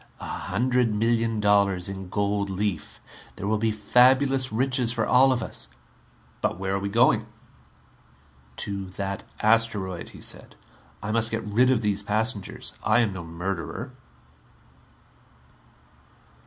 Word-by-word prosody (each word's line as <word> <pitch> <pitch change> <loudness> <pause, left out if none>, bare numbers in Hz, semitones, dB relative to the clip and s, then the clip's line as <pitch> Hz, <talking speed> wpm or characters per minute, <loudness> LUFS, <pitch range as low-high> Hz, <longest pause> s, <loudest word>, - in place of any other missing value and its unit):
A - - -7
hundred 125 -2 0
million 115 0 +1
dollars 100 -3 +3
in 95 -1 -7
gold 100 0 -1
leaf. 95 -3 -3 0.4
There 100 - -6
will 105 +1 +1
be 110 0 +1
fabulous 130 +5 +3
riches 125 +1 +2
for 115 -2 0
all 130 +2 +5
of 125 -2 0
us - - -7 0.4
" - - -32
"But - - -1
where 95 0 -2
are 100 - 0
we 100 0 -3
going?" 115 0 +3 1.3
"To 100 +3 -3
that 100 0 -4 0.2
asteroid," 110 -5 +1
he - - -13
said. - - -5 0.5
"I 105 - -2
must 115 0 +1
get 115 0 -3
rid 115 +5 +3
of 120 -3 +2
these 105 -1 +1
passengers. 105 0 -2
I 110 +3 +4
am 110 -4 0
no 95 -2 -6
murderer." 90 +8 -5
110 Hz, 140 wpm, -25 LUFS, 100-120 Hz, 1.3 s, all